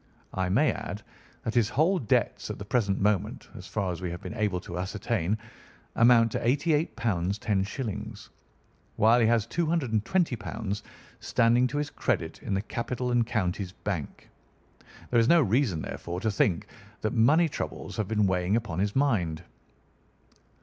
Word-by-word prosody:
I 95 -1 -1
may 125 +8 +3
add 105 0 -6 0.4
that 115 - -2
his 115 -3 +3
whole 165 +9 +2
debts 110 - 0
at - - -4
the 100 - -7
present 100 -4 +1
moment, 105 -1 0
as - - -9
far 100 -4 -1
as 90 - -6
we 90 - -2
have 85 +1 -5
been - - -7
able 105 -5 0
to 90 -1 -6
ascertain, 100 0 -1 0.6
amount 115 -1 +5
to - - -1
£ - - -9
88 150 +6 +1
10_s_., 105 +2 -2 0.7
while 115 +3 +5
he 115 - +4
has 115 -2 +3
£ - - -31
220 130 - 0 0.4
standing 120 +2 +3
to 140 +4 -4
his 145 0 -2
credit 90 -10 -2
in 100 - -2
the 95 - -1
Capital 125 +2 -3
and 120 -2 +2
Counties 95 -4 -1
Bank. 90 -9 -5 0.8
There 120 - +4
is 115 - +3
no 170 - +7
reason, 110 - +1
therefore, 85 +1 -5
to 110 - +1
think 95 -3 +1 0.4
that 110 - -1
money 145 +9 +5
troubles 150 - -5
have 110 -3 -1
been 105 -1 +2
weighing 95 +1 +1
upon 110 -7 -2
his 100 +1 0
mind. 90 - +1
110 Hz, 165 wpm, -28 LUFS, 95-125 Hz, 0.8 s, no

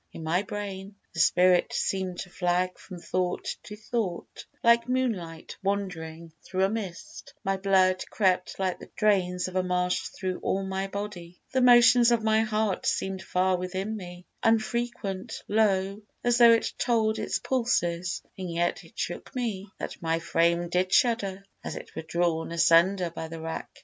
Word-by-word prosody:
In 160 - -9
my 165 +4 +1
brain 200 -1 -6 0.2
The 165 - -6
spirit 180 +2 +4
seem'd 185 -2 -1
to 180 - -9
flag 180 +1 0
from 180 - -10
thought 180 +1 -2
to 210 - -9
thought, 215 -4 -4 0.2
Like 235 +1 +4
moonlight 200 -11 -2
wandering 170 -5 -3
through 190 0 -1
a 195 - +3
mist: 200 -5 -6
my 195 -1 +1
blood 190 -1 +3
Crept 185 -3 +1
like 190 -2 -1
the - - -12
drains 185 -4 +2
of 185 - -8
a 185 - +3
marsh 180 0 0
thro' 185 -2 -4
all 195 +1 0
my 190 0 -2
body; 195 -4 -7
The 260 - +3
motions 240 -1 +7
of 235 -2 +2
my 220 0 +3
heart 215 -2 0
seem'd 190 0 -1
far 185 0 +1
within 190 +4 -3
me, 180 -3 -9 0.2
Unfrequent, 225 -3 -1
low, 200 -1 +1 0.2
as 240 0 +2
tho' 235 -1 +9
it 230 - +2
told 220 -2 +1
its - - -1
pulses; 180 -9 0 0.2
And 185 -2 -4
yet 170 +1 -1
it - - -19
shook - - -5
me, 215 -6 -3
that - - -6
my 165 0 +1
frame 170 +1 +1
did 180 +2 0
shudder, 200 -6 +2 0.2
As - - -5
it - - -10
were - - -3
drawn 165 0 -1
asunder 170 +2 +4
by 165 -1 -6
the 165 0 -8
rack. 160 0 -5
190 Hz, 165 wpm, -27 LUFS, 175-215 Hz, 0.2 s, tho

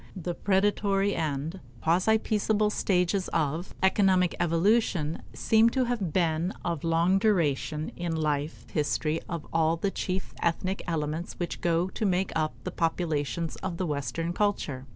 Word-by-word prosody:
The 180 -1 -3
predatory 200 +1 +1
and 155 +3 -2 0.2
quasi 185 +7 +3
peaceable 215 -1 +1
stages 185 -1 +1
of 160 +2 -1
economic 190 -2 +3
evolution 170 -2 +2
seem 225 +1 +4
to 260 - +4
have 235 -9 -1
been 170 +1 +1
of 170 -4 -2
long 170 +3 +3
duration 160 -7 +1
in 170 -2 -2
life 150 -1 -2
history 155 +1 0
of 170 -4 -4
all 165 0 +2
the 195 +4 -1
chief 185 0 -3
ethnic 185 +3 0
elements 160 0 -2
which 175 - -4
go 170 +1 +2
to 220 - -5
make 190 -1 +1
up 155 -5 0
the - - -4
populations 165 -1 -1
of 185 -3 -4
the 185 - -1
Western 165 +3 -2
culture. 155 -10 -1
170 Hz, 145 wpm, -28 LUFS, 160-195 Hz, 0.2 s, seem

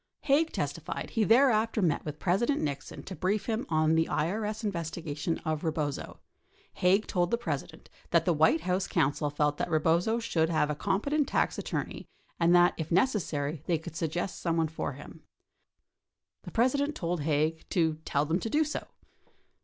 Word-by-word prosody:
52 275 - +2
Haig 320 +3 +3
testified - - -4
he 225 - +1
thereafter 225 -1 +4
met 170 -7 +1
with 150 -1 -6
President 220 - +1
Nixon 140 -2 -4
to 190 - -7
brief 195 +4 0
him 225 0 -2
on 155 0 +3
the. 160 0 +2
IES 210 +7 -1
investigation 165 -4 -3
of 155 -1 -1
Eebozo. 155 -4 -3 0.6
Haig 190 +4 +3
told 175 -3 0
the 235 - +1
President 155 - -5 0.2
that 170 -1 +3
the 175 - +3
White 160 +1 +3
House 180 +2 0
counsel 145 +2 +1
felt 145 0 0
that - - -2
Eebozo 170 +8 +2
should 165 -8 0
have 155 -2 +1
a - - -2
competent 245 - 0
tax - - 0
attorney - - -4 0.3
and 170 +1 +5
that 175 0 +6
if 160 -1 -5
necessary 165 - 0
they 170 - +2
could 160 +1 -9
suggest 170 +3 -3
someone 165 -2 +1
for 155 -2 -4
him. 145 +4 -12 1.2
The - - -7
President 280 +5 +1
told 170 -1 -2
Haig 155 +2 0
to 160 -3 +1
"tell 145 -1 0
them 165 +4 0
to 225 - -4
do 305 +6 +3
so." 305 - -4
170 Hz, 170 wpm, -29 LUFS, 155-215 Hz, 1.2 s, that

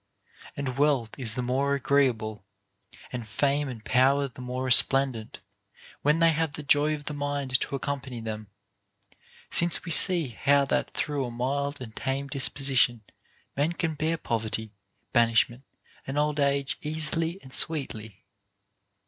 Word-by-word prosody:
And 135 -2 -4
wealth 140 -7 +2
is 115 -4 0
the 125 - -2
more 135 +3 0
agreeable, 125 -7 0 0.7
and 120 -3 -5
fame 140 +7 0
and 115 -4 -9
power 135 +2 +3
the 130 0 -12
more 125 +1 -4
resplendent, 130 -3 +3 0.6
when 150 +2 +2
they 165 0 +4
have 160 -1 -1
the 150 - -7
joy 145 +2 +3
of 145 - -10
the 150 - -5
mind 145 -3 -1
to - - -3
accompany 135 -3 -4
them; 110 -1 -6 1.0
since 170 +1 +2
we 170 - -4
see 170 -3 +6
how 140 +4 +2
that - - -2
through 145 -2 -2
a - - -5
mild 140 +4 -3
and 115 -4 -9
tame 135 +1 -3
disposition 135 -4 +1 0.5
men 150 +5 0
can 165 -2 -2
bear 155 +2 -1
poverty, 110 -4 -3 0.4
banishment, 120 +1 +2 0.4
and 135 +2 -4
old 150 0 0
age 140 -1 0
easily 160 +3 -1
and 130 - -14
sweetly. 110 - 0
140 Hz, 145 wpm, -27 LUFS, 125-145 Hz, 1.0 s, see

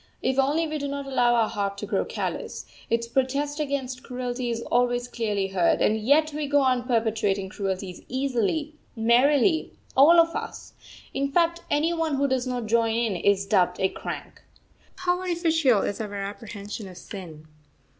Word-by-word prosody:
If 265 +1 +1
only 300 +5 +2
we 305 0 -3
do 285 - -3
not 280 0 -4
allow 245 -3 +2
our 225 -2 +3
heart 200 -2 -3
to - - -5
grow - - 0
callous, - - -4 0.2
its 230 0 0
protest 275 +4 -1
against 270 -3 -2
cruelty 250 -1 -4
is 230 0 -2
always 245 0 +1
clearly 210 -5 -2
heard; 185 -3 +2
and 215 - +3
yet 290 +8 +2
we 300 -1 -2
go 285 0 +3
on 255 -2 +1
perpetrating 220 -5 0
cruelties 190 -2 -4
easily, 270 +3 -1 0.2
merrily, 260 +8 +3 0.2
all 315 +6 +7
of 335 0 +3
us - - -6 0.4
in 275 +1 -1
fact, 340 +2 +2
any 310 +4 +2
one 325 -3 0
who 280 +1 +1
does 260 -1 0
not 250 -2 -2
join 225 0 +2
in 230 -4 0
is 195 +2 +2
dubbed 185 -3 +2
a 190 - +2
crank. - - -7 0.5
How 360 -1 0
artificial 325 - +2
is 205 - -2
our 205 -2 -5
apprehension 205 +1 -6
of 180 -1 -11
sin! 170 -5 -9
245 Hz, 170 wpm, -25 LUFS, 210-285 Hz, 0.5 s, all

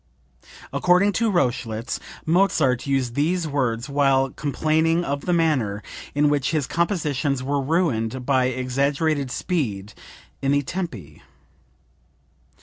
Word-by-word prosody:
(According 180 +3 +3
to 225 +4 +1
Rochlitz 120 - -1 0.3
Mozart 155 -8 +2
used 135 -3 0
these 165 +5 0
words 130 -4 -1
while 135 -2 +2
complaining 160 +4 +1
of 140 +1 -3
the - - +2
manner 135 -12 +1 0.3
in 145 +1 +3
which 145 -2 +1
his 155 -4 0
compositions 150 -7 -1
were 140 +1 0
ruined 130 -6 0
by 130 -2 +3
exaggerated 135 +3 0
speed 105 - -2 0.5
in 135 +1 +1
the 145 0 +2
tempi.) 120 - -6
140 Hz, 115 wpm, -23 LUFS, 125-160 Hz, 0.5 s, According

